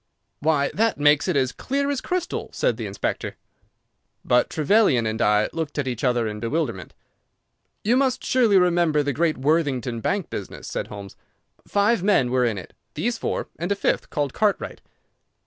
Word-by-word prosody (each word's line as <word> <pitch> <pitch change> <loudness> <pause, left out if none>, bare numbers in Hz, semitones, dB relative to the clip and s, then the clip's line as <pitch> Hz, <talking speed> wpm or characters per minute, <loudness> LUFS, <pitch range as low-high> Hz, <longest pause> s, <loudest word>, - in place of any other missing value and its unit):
"Why, 145 -2 +1
that 225 +2 +1
makes 145 +2 +4
it 180 - 0
as 130 -2 +2
clear 280 - -2
as 275 - -2
crystal," 360 -1 -3
said - - +1
the - - -4
inspector. - - -3 0.9
But - - +3
Trevelyan 155 - +3
and 110 +1 -2
I 105 0 +3
looked 160 -3 -4
at 145 -2 -1
each 120 -1 -4
other 120 -3 +2
in 105 0 -5
bewilderment. 115 - -3 0.9
"You 230 +4 +3
must 260 -2 +1
surely 235 -6 +4
remember 170 -4 +3
the 145 0 -1
great 160 +2 +1
Worthingdon 130 -5 0
bank 195 - -1
business," 100 - -6
said - - -3
Holmes. 100 -2 -9 0.5
"Five 205 +1 +2
men 185 -11 +3
were 125 -1 +2
in 115 -4 0
it—these 230 - -5
four - - -3
and 175 +4 -2
a - - +3
fifth - - -1
called 145 -4 -2
Cartwright. 210 -2 -1
150 Hz, 165 wpm, -23 LUFS, 125-200 Hz, 0.9 s, makes